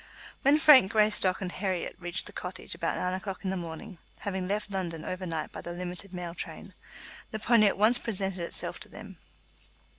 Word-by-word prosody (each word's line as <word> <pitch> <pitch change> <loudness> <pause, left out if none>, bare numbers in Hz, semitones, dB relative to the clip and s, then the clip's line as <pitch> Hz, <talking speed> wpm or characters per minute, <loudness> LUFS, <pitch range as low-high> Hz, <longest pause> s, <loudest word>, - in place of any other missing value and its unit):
When 280 +2 +6
Frank 280 -10 +8
Greystock 210 -4 +3
and 185 -2 -3
Herriot 185 -2 -2
reached 175 +1 -1
the - - -7
cottage 185 +1 -5
about 165 - -1
nine 180 0 -1
o'clock 190 +1 -5
in 190 - 0
the - - -1
morning, 170 +2 -6 0.2
having 190 -2 -2
left 205 +1 -1
London 170 -4 -3
over 185 0 -3
night 160 -2 -3
by - - -7
the 175 - -6
limited 180 +2 -5
mail 175 -2 -5
train, 170 - -7 0.6
the 215 - -3
pony 215 -1 +5
at - - +1
once 220 +4 +5
presented 195 -4 -2
itself 170 - -4
to - - -9
them. - - -11
190 Hz, 190 wpm, -29 LUFS, 180-210 Hz, 0.6 s, Frank